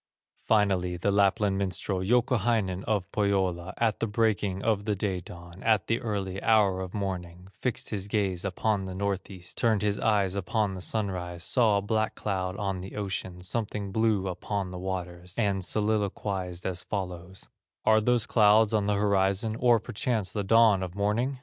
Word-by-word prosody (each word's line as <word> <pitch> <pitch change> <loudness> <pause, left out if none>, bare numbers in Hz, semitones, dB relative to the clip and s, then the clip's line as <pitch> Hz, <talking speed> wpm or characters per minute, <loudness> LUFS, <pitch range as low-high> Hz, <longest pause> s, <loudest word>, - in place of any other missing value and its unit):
Finally 95 -5 +1
the 100 +4 0
Lapland 100 0 +2
minstrel, 95 0 -2
Youkahainen 115 -4 +1
of 100 -3 -1
Pohyola, 95 -4 0
At 115 -2 +1
the 115 - 0
breaking 105 -3 0
of 105 -3 +1
the 105 -2 0
day 95 -2 -1
dawn, 85 +1 -11
At 110 -2 +2
the 115 - 0
early 95 -4 -3
hour 100 -4 +3
of 95 +1 -6
morning, 90 -2 -4
Fixed 125 +3 -3
his 100 -2 -2
gaze 100 -4 -1
upon 100 +1 -1
the 95 -1 -6
North 100 0 -2
east, 90 -3 -12
Turned 110 -3 +2
his 105 -1 0
eyes 100 -4 +2
upon 100 +1 -1
the 95 - -7
sunrise, 90 -4 -3
Saw 110 -5 +3
a 100 - -1
black 110 +1 0
cloud 95 -2 -2
on 95 -3 -2
the 95 - -8
ocean, 95 -3 -4
Something 100 +1 -3
blue 110 -2 +1
upon 95 +1 -3
the 90 - -6
waters, 90 -1 -5
And 100 -4 +1
soliloquized 100 -3 -1
as 90 -1 -2
follows: 95 -2 -6 0.4
"Are 110 0 +5
those 120 0 +2
clouds 110 0 +4
on 105 -2 +1
the 105 - +2
horizon, 100 +2 +1
Or 120 -2 +5
perchance 110 -3 -2
the 105 - -1
dawn 110 -1 +5
of 90 -1 -5
morning? 110 +7 0
100 Hz, 170 wpm, -28 LUFS, 95-110 Hz, 0.4 s, Are